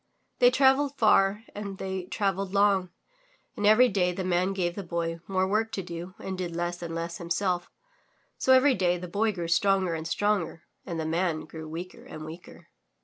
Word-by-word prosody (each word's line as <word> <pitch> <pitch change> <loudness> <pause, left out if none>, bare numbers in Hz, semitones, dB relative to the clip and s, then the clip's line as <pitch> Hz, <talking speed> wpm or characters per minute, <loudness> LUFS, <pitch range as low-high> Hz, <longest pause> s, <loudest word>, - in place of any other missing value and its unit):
They 245 - +7
travelled 270 +2 +3
far 205 -1 +4
and 200 -2 -6
they 190 -1 -4
travelled 195 0 -2
long, 200 -2 +3 0.7
and 205 - +1
every 225 +4 +7
day 185 -5 +1
the 185 +2 -4
man 185 +1 +1
gave 180 -3 -1
the 200 - -5
Boy 170 -2 -3
more 190 -1 +1
work 220 +3 0
to 195 - -2
do 175 +1 -7
and 190 - -5
did 180 -2 -4
less 175 0 -3
and 165 -1 -5
less 170 +1 -4
him 170 - -8
self, 180 -1 0 0.7
so 260 - +1
every 260 +2 +6
day 180 -4 +1
the 180 +1 -7
Boy 215 +5 +1
grew 175 -4 -4
stronger 190 +1 +2
and 160 0 -4
stronger, 195 -3 0 0.2
and 170 -3 -3
the 160 - -2
Man 165 0 0
grew 160 0 -9
weaker 175 +3 -7
"and 155 0 -9
weaker. 165 +3 -11
185 Hz, 195 wpm, -27 LUFS, 170-200 Hz, 0.7 s, They